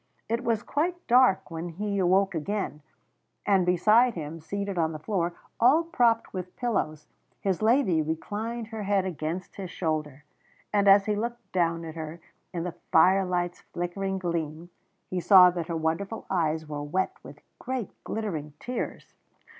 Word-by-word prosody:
It 230 +3 -1
was 230 -3 0
quite 345 +5 -1
dark 245 -8 +4
when 165 +1 -4
he 200 +4 -2
awoke 190 +2 +3
again, 165 -1 -3 0.6
and 190 -3 +3
beside 215 +7 +4
him 160 0 -6
seated 200 +4 -4
on 165 -2 +1
the - - -4
floor, 175 0 -2 0.2
all 270 +8 +5
propped 240 -9 +1
with 185 -1 -6
pillows, 155 -11 -1 0.3
his 190 -1 -1
lady 220 - +3
reclined 215 +9 -4
her 220 -1 -5
head 200 -1 +1
against 175 0 -4
his 190 -3 -5
shoulder. 150 -5 -3 0.5
And 200 -1 +3
as 195 0 +7
he 210 - +1
looked 235 +3 -4
down 170 -2 0
at 160 - -6
her 160 +1 -6 0.3
in 170 -2 -3
the 180 -1 -4 0.2
firelight's 180 0 +3
flickering 190 +2 -3
gleam, 170 -2 -3 0.4
he 185 - -2
saw 180 0 +8
that 170 -2 -4
her 170 -2 -2
wonderful 165 +7 -2
eyes 160 -3 0
were 145 -1 -4
wet 180 +6 -1
with 140 +3 -12 0.2
great 255 -4 -3
glittering 160 -10 -4
tears. 250 0 -5
185 Hz, 155 wpm, -27 LUFS, 165-210 Hz, 0.6 s, saw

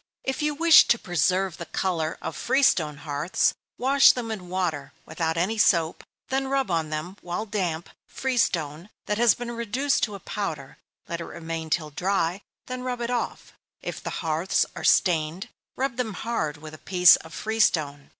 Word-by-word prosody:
If 265 +1 -2
you 300 0 0
wish 330 +1 +7
to 235 - +4
preserve 180 0 0
the 170 - -7
color 165 -4 -2
of 160 - -4
free 270 - +1
stone 150 - +3
hearths, 150 +4 +1 0.2
wash 270 +2 +6
them 235 -3 -4
in 185 -5 -6
water, 165 -7 -2
without 160 +1 -2
any 205 +6 0
soap; 165 -5 +2 0.3
then 270 +1 0
rub 270 -5 0
on 165 -2 0
them, 155 +5 -5
while 175 +5 -4
damp, 180 -6 -2 0.2
free 265 -1 -3
stone, 165 -4 0 0.2
that 210 +1 -1
has 235 -4 +5
been 240 0 -5
reduced 240 +4 0
to 210 - -8
a - - -8
powder 165 -9 -5 0.3
let 170 0 -4
it - - -5
remain 165 -1 -6
till 155 -1 -1
dry, 180 +2 -1 0.2
then 255 0 -5
rub 250 -1 -3
it 235 +1 -2
off. 245 - -3 0.3
If - - -5
the - - -4 0.2
hearths 165 +5 +1
are - - -7
stained, 165 0 +2 0.3
rub 265 -2 -2
them 225 -6 -2
hard 160 -11 -2
with 155 +1 -10
a 155 - -11
piece 180 -2 +6
of 160 - -13
free 220 +5 -4
stone. 145 -8 +1
185 Hz, 185 wpm, -25 LUFS, 160-235 Hz, 0.3 s, wish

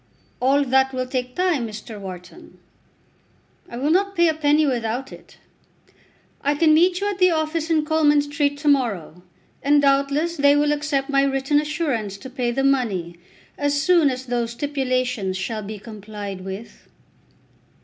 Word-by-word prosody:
"All 275 +3 +3
that 265 0 +2
will 255 0 -2
take 250 -1 -4
time, 350 -10 0
Mr. 215 0 -9
Wharton." 180 -2 -10 1.1
"I 235 - -7
will 285 +5 0
not 395 +3 +1
pay 340 -1 +4
a - - +1
penny 305 0 +2
without 245 0 -2
it. - - -14 1.0
I 285 +1 +1
can 310 +1 +4
meet 355 +3 +3
you 405 - -1
at 390 - -7
the 365 0 +5
office 315 0 -1
in 315 -2 +2
Coleman 300 -2 +3
Street 290 -1 -1
to 295 +1 -5
morrow, 210 - 0 0.4
and 290 +1 +4
doubtless 280 +4 +1
they 285 0 +5
will 295 0 +2
accept 290 -2 -1
my 275 0 +4
written 275 +1 +1
assurance 285 - -2
to 255 +6 -10
pay 250 -2 -1
the 270 +3 -1
money 205 -11 0 0.4
as 285 0 +1
soon 335 -1 +4
as 255 0 -5
those 240 -2 -2
stipulations 255 -8 -1
shall 215 +3 -3
be 210 +1 -7
complied 205 -2 -8
with." 195 +4 -9
275 Hz, 160 wpm, -22 LUFS, 235-300 Hz, 1.1 s, the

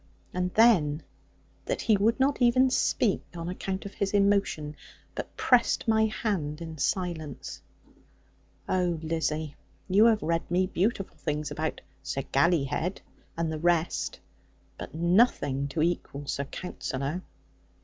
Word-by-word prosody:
And 180 0 -1
then, 170 -10 +4 0.6
that - - -2
he 220 - +4
would 220 +5 +2
not 270 0 +2
even 255 +2 +5
speak, 230 -4 +2
on 170 0 -5
account 190 +2 -4
of 200 - -7
his 200 0 -1
emotion; 200 -7 +2 0.4
but - - -6
pressed 245 -2 +3
my 220 0 +4
hand 180 -9 -2
in 160 -2 -7
silence! 160 -3 -3 1.1
Oh, 180 -2 +1
Lizzie, 155 -2 -2 0.3
you 200 +3 +5
have 225 -3 +4
read 165 +1 -1
me 180 +2 +2
beautiful 195 +2 -1
things 150 -1 -3
about 155 0 -3 0.2
Sir 135 - -3
Gallyhead, 155 +3 +1 0.4
and 165 -1 -1
the 155 - -3
rest; 170 0 0 0.6
but - - -9
nothing 165 - +2
to 155 +3 -1
equal 155 -4 -2
Sir 140 0 -2
Counsellor.' 140 0 -4
175 Hz, 130 wpm, -28 LUFS, 155-200 Hz, 1.1 s, even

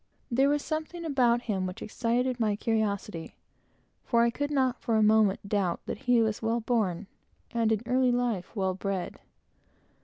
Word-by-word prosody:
There 270 +4 +3
was 290 0 0
something 315 +2 -4
about 245 -5 +2
him 190 -4 -1
which 185 - -7
excited 245 +3 -1
my 215 -3 +1
curiosity; 210 -5 -2 0.7
for 235 -1 +3
I 235 - +3
could 285 +4 -2
not, 265 -3 0
for 230 - 0
a 220 - +4
moment, 210 -2 +3
doubt 195 -4 0
that - - -5
he 240 -2 +5
was 220 -1 -1
well 225 +1 0
born, 210 -6 0 0.5
and, 230 -2 +1
in 220 0 0
early 255 +1 +2
life, 235 -6 -1
well 190 -2 0
bred. 190 -1 -4
230 Hz, 165 wpm, -28 LUFS, 205-245 Hz, 0.7 s, he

